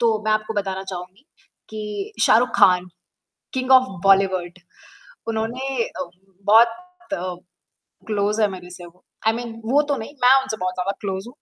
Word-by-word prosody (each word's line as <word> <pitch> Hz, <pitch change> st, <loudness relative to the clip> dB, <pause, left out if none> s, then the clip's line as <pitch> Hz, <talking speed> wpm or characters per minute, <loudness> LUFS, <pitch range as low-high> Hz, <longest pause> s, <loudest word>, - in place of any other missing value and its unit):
तो 225 Hz, -2 st, +2 dB
मैं 215 Hz, -, +2 dB
आपको 215 Hz, +1 st, -1 dB
बताना 190 Hz, -2 st, -2 dB
चाहूँगी 185 Hz, +4 st, -8 dB, 0.5 s
कि 210 Hz, -2 st, -5 dB
शाहरुख 240 Hz, +3 st, +5 dB
खान 180 Hz, -1 st, +5 dB, 0.7 s
किंग 255 Hz, 0 st, -1 dB
ऑफ 260 Hz, 0 st, +7 dB, 0.2 s
बॉलीवुड 190 Hz, -2 st, +2 dB, 0.7 s
उन्होंने 225 Hz, +4 st, -2 dB, 0.3 s
अ 180 Hz, -, -4 dB, 0.4 s
बहुत 230 Hz, -, +1 dB, 0.6 s
क्लोज 210 Hz, 0 st, 0 dB
है 210 Hz, -, +4 dB
मेरे 180 Hz, -2 st, -9 dB
से 180 Hz, 0 st, -10 dB
वो 175 Hz, +2 st, -19 dB, 0.3 s
आई -, -, +4 dB
मीन 235 Hz, -1 st, -5 dB
वो 270 Hz, +6 st, +3 dB
तो 285 Hz, -, +2 dB
नहीं 220 Hz, -, -7 dB
मैं 250 Hz, +2 st, +7 dB
उनसे 265 Hz, -5 st, -4 dB
बहुत 185 Hz, 0 st, -2 dB
ज़्यादा 185 Hz, +2 st, -2 dB
क्लोज 190 Hz, -1 st, -4 dB
हूँ। 250 Hz, -, -13 dB
210 Hz, 160 wpm, -22 LUFS, 185-235 Hz, 0.7 s, ऑफ